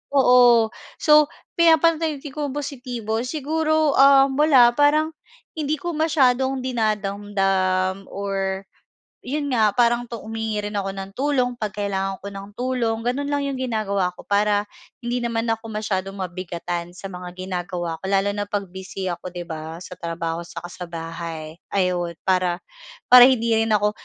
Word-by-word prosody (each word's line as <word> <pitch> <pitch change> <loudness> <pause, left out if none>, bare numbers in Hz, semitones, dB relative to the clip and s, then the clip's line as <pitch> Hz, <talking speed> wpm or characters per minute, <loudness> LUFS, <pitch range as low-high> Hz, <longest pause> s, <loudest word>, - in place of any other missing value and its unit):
oo. 245 -4 +6 0.3
So, 300 -1 +6 0.3
pinapanatili 325 -3 +3
kong 290 -2 -3
positibo 245 -6 -3
siguro, 310 +2 +1
um, 275 0 +6
wala 275 -6 +6
parang 300 +2 +4 0.5
hindi 300 -1 -1
ko 350 - -3
masyadong 265 -4 +2
dinadamdam 195 -4 0
or 195 -1 -2 0.6
'yon 285 +2 -3
nga 220 -4 +4
parang 240 0 +2
tu 235 - -7
humihingi 220 -1 -3
rin 210 - -5
ako 195 -1 -2
ng 195 0 -6
tulong 270 -2 +1
'pag 210 -3 -4
kailangan 195 -2 -2
ko 200 - -6
ng 195 0 -8
tulong. 245 -3 -1
Gano'n 260 +4 -1
lang 285 0 0
'yong 275 -2 -3
ginagawa 210 -7 0
ko - - -11
para 205 0 +2 0.4
hindi 240 +1 -1
naman 230 -1 -1
ako 225 0 -2
masyadong 195 -2 -2
mabigatan 175 -1 -4
sa 195 - -8
mga 180 -1 -7
ginagawa 180 -2 -4
ko - - -14
lalo 195 +1 +2
na 205 0 -3
'pag 200 -1 -2
busy 190 +1 -6
ako 175 +1 -6
'di 175 -1 -5
ba 160 0 -6
sa 180 - -10
trabaho 165 0 -3
'saka 175 0 -8
sa 180 -1 -7
bahay, 165 -1 -6 0.2
ayon. 180 -3 0
Para 180 -2 +2 0.5
para 250 0 +11
hindi 235 -3 +2
rin 225 0 +1
ako 210 0 +3
210 Hz, 150 wpm, -22 LUFS, 185-260 Hz, 0.6 s, para